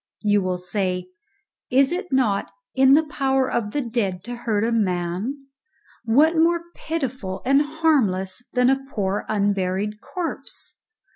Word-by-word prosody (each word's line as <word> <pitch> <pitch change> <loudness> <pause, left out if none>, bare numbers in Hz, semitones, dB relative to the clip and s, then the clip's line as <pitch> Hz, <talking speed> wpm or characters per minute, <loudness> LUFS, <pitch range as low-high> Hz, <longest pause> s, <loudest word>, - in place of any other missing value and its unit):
You 205 -1 +3
will 185 -1 -1
say, 180 0 -2 0.6
"It 265 +1 +4
is 360 +3 -1
not 230 -7 +1 0.2
in 265 +1 +6
the 315 - +4
power 270 -3 +1
of 225 -5 -1
the 290 +7 -1
dead 215 -7 -2
to 245 +2 -6
hurt 225 -3 -1
a 230 - +1
man; 200 +5 -1 0.6
what 295 +9 +4
more 335 +1 +3
pitiful 260 - -4
and 275 +2 +4
harmless 260 - +1
than 250 +1 +4
a 270 0 0
poor 200 -4 -2
unburied 200 0 0
corpse?" 355 -3 -6
235 Hz, 140 wpm, -23 LUFS, 195-275 Hz, 0.6 s, in